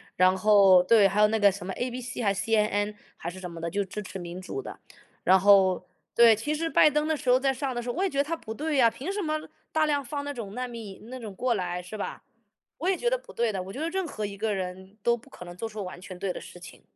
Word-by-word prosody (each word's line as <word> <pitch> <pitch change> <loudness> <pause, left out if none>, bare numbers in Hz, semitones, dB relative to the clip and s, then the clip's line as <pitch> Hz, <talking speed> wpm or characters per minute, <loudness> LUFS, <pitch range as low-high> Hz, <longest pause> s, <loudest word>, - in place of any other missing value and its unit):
然 185 +1 +4
后， 195 -2 +6
对， 210 +1 +6
还 205 +2 +1
有 210 - +7
那 220 +1 0
个 205 -1 +6
什 190 -1 -8
么 190 - -4
ABC 250 +1 -4
还 200 -2 +3
是 195 0 -3
CNN， 210 -1 +1 0.2
还 170 - -5
是 185 +2 -9
什 180 -1 -6
么 170 -1 -9
的？ 170 - -2
就 200 +4 -1
支 200 +3 -6
持 190 0 -7
民 175 +1 -7
主 200 - -5
的。 - - -9 0.4
然 190 +1 +6
后， 190 -1 +5 0.3
对， 235 -2 +7
其 260 +8 -2
实 325 +2 -1
拜 305 - +6
登 300 +1 0
的 315 - +1
时 260 - -3
候， 250 +1 +6
在 270 0 +1
上 270 0 -3
的 240 - -3
时 240 - -6
候， - - -2
我 365 - 0
也 390 - +2
觉 275 - -6
得 280 - +4
他 320 +3 -2
不 220 -9 -7
对 300 +4 -2
呀， 235 -3 +5
凭 290 +12 -5
什 410 +1 -2
么， 310 -3 -2 0.2
大 315 0 +2
量 290 -2 +1
放 285 +2 -4
那 285 - -3
种 215 -6 -7
难 250 +2 -4
民 220 -2 -9
那 260 - -6
种 215 -4 -7
过 245 +5 0
来， 180 -2 -3
是 180 +5 -8
吧？ - - -5 0.6
我 345 +5 0
也 385 - +3
觉 480 - +1
得 - - +1
不 - - -15
对 235 -1 +1
的， 195 -3 -3
我 190 +1 -9
觉 265 - -6
得 320 +2 -1
任 380 0 -2
何 215 -8 -4
一 200 -1 -6
个 215 0 -1
人， 190 +2 -6
都 235 0 +3
不 220 - -19
可 - - -11
能 175 0 -9
做 225 - -3
出 215 -2 -6
完 180 -1 -8
全 185 0 -9
对 190 +1 -2
的 - - -6
事 - - -12
情。 170 - -12
220 Hz, 335 characters per minute, -27 LUFS, 190-275 Hz, 0.6 s, 有